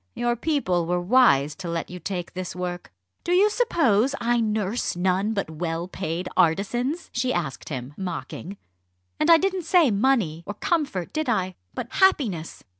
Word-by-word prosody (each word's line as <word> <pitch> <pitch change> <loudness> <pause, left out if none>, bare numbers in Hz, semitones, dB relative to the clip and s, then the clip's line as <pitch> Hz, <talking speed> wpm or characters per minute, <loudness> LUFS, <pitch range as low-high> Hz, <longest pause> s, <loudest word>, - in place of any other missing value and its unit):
Your 240 0 0
people 225 - 0
were 180 +1 +1
wise 175 - +4
to 185 -3 -6
let 170 0 -3
you 180 - -7
take 175 0 -5
this 185 -1 -5
work." 180 -1 -5 0.3
"Do 350 - 0
you 405 +4 +5
suppose 280 - +2
I 240 +1 +1
nurse 215 -1 -1
none 190 +4 0
but 200 -5 -2
well 165 +2 -3
paid 180 -1 -4
artisans?" 240 - +1
she 250 +1 0
asked 155 - -3
him, 130 -1 -5
mocking. 180 +2 -6 0.6
"And 305 - +2
I 335 - +9
didn't 375 +1 0
say 330 -6 +4
'money' 205 -7 +1
or 205 - -4
'comfort,' 275 - -1
did 310 -4 -1
I? 185 -5 0 0.2
but - - -4
'happiness.' 235 - +1
200 Hz, 165 wpm, -24 LUFS, 175-260 Hz, 0.6 s, I